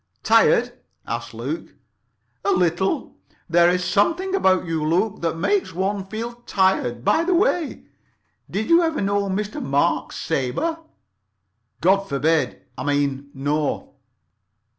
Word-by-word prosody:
"Tired?" 480 +1 +3 0.3
asked - - -4
Luke. - - -6 0.7
"A - - 0
little. 180 - 0 0.3
There's 175 +1 +3
something 345 - +1
about 190 - +3
you, 165 -2 -2
Luke, 185 +7 0
that 165 -1 -1
makes 365 - 0
one 195 +1 -1
feel 230 +4 -5
tired. 130 -11 +1
By 325 - +3
the 360 +1 +1
way, 350 - 0 0.7
did 215 +3 -2
you 335 +1 +6
ever 325 -2 0
know 200 0 0
Mr. 205 +2 -3
Mark 140 +1 +1
Sabre?" 295 - -2 1.0
"God 195 +3 +3
forbid—I 140 -3 -1
mean, 140 -1 -1
no." 145 +2 -2
190 Hz, 120 wpm, -22 LUFS, 155-235 Hz, 1.0 s, you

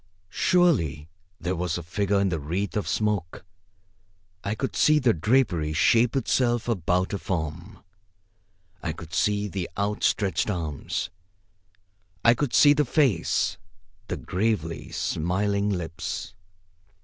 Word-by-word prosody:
Surely 85 - +2 0.3
there 90 +2 -2
was 85 -1 -2
a 85 - -6
figure 100 +4 0
in 100 -1 +2
the 85 -3 -2
wreath 85 +6 -3
of 105 - -1
smoke. 100 -5 -1 1.0
I 105 +2 -2
could 135 +4 -3
see 155 0 +4
the 130 -6 +3
drapery 90 -6 +1
shape 115 - +3
itself 120 -3 +1
about 90 -4 0
a 100 - -2
form. 85 +2 -4 1.0
I 80 - -2
could 80 +1 -11
see 105 +3 +1
the 95 -2 -4
outstretched 100 -2 0
arms. 80 -8 -3 1.1
I 115 - +8
could 130 +1 -1
see 145 -1 +7
the 150 0 +2
face, 125 - +1 0.5
the - - -3
gravely 95 -4 -2
smiling 100 +5 0
lips. 85 -4 -4
100 Hz, 125 wpm, -26 LUFS, 85-110 Hz, 1.1 s, I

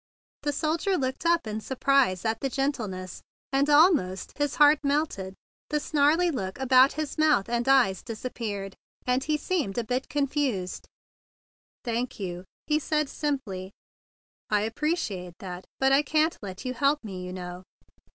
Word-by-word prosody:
The 290 - 0
soldier 320 +6 0
looked 260 +5 -2
up 340 -5 +3
in 215 0 -4
surprise 265 -7 +2
at 220 0 0
the 270 - 0
gentleness, 220 -10 -3 0.3
and 275 +2 +2
almost 290 - +3
his 290 0 0
heart 295 -1 +6
melted. 280 -10 -1 0.3
The 300 - +1
snarly 310 +4 +3
look 190 -9 -4
around 260 +1 +5
his 310 0 -4
mouth 305 -10 +3
and 240 +1 -1
eyes 245 -9 +4
disappeared, 215 -4 -5 0.3
and 250 +1 +1
he 305 +1 0
seemed 300 - -2
a 240 - +1
bit 250 +4 -2
confounded. 275 -10 -1 1.0
"Thank 240 +1 -2
you," 180 -2 -5 0.2
he 305 0 +2
said 300 -1 0
simply. 210 -13 -3 0.8
"I 210 0 +2
ap¬ 225 - -7
preciate 210 - -2
that. 180 -1 -7
But 270 0 +3
I 275 +1 +6
can't 310 +3 +1
let 190 0 -8
you 255 - -2
help 280 +4 +2
me, 190 -4 -6
you 180 - -6
know." 180 -1 -7
260 Hz, 155 wpm, -27 LUFS, 195-295 Hz, 1.0 s, heart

